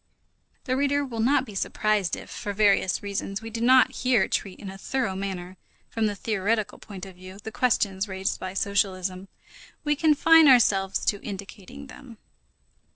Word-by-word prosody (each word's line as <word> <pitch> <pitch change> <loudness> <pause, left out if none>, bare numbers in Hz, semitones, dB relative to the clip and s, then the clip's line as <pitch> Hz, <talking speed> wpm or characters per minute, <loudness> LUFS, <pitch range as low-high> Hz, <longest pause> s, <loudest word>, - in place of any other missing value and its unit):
The 255 - -1
reader 285 +1 +1
will 235 -4 -6
not 260 +3 +2
be 215 - -11
surprised 205 -1 0
if, - - -10
for 205 - -5
various 200 -2 +2
reasons, 200 +1 -4
we 225 - -7
do 230 +1 -5
not 255 +2 +5
here 250 -5 +2
treat 195 -2 -3
in 195 - -7
a 195 - -10
thorough 245 -4 -2
manner, 190 -1 -5 0.3
from 225 -1 0
the 205 - -3
theoretical 215 +1 -1
point 195 -3 -9
of 190 - -11
view, 185 +1 -11
the 220 - -6
questions 205 -5 0
raised 190 -1 -3
by 185 0 -6
socialism. 190 -2 -1 0.6
We 295 0 +1
confine 320 +1 +5
ourselves 195 -7 +4
to 205 - 0
indicating 200 +6 -9
them. 260 -3 -13
205 Hz, 165 wpm, -25 LUFS, 195-250 Hz, 0.6 s, not